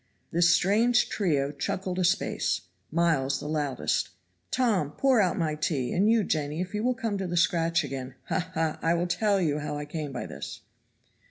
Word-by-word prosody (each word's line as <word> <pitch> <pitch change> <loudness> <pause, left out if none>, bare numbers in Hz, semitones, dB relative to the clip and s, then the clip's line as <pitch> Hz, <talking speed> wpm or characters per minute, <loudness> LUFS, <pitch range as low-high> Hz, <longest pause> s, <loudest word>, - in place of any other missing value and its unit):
This 170 +1 +4
strange 220 +8 +3
trio 145 -8 0
chuckled 185 +5 -3
a - - +2
space. 185 +2 +1 0.3
Miles 155 -5 +1
the - - -6
loudest. 145 -4 -1 0.4
"Tom, 205 - +1
pour 260 - +3
out 185 - +1
my 160 -3 0
tea; 150 -4 -1
and 200 +4 +3
you, 225 -1 +4
Jenny, 150 -3 -1
if 185 +2 -3
you 210 +1 -1
will 250 +1 +2
come 225 -6 -2
to 190 - -2
the 175 0 -2
scratch 165 0 +2
again, 130 -2 -6
ha! 180 - -2
ha! 160 -1 0
I'll 170 +1 +2
tell 200 +3 +1
you 150 -4 +1
how 150 0 -4
I 145 - -4
came 150 -1 -5
by 125 - -4
this." - - -7
170 Hz, 185 wpm, -27 LUFS, 150-195 Hz, 0.4 s, This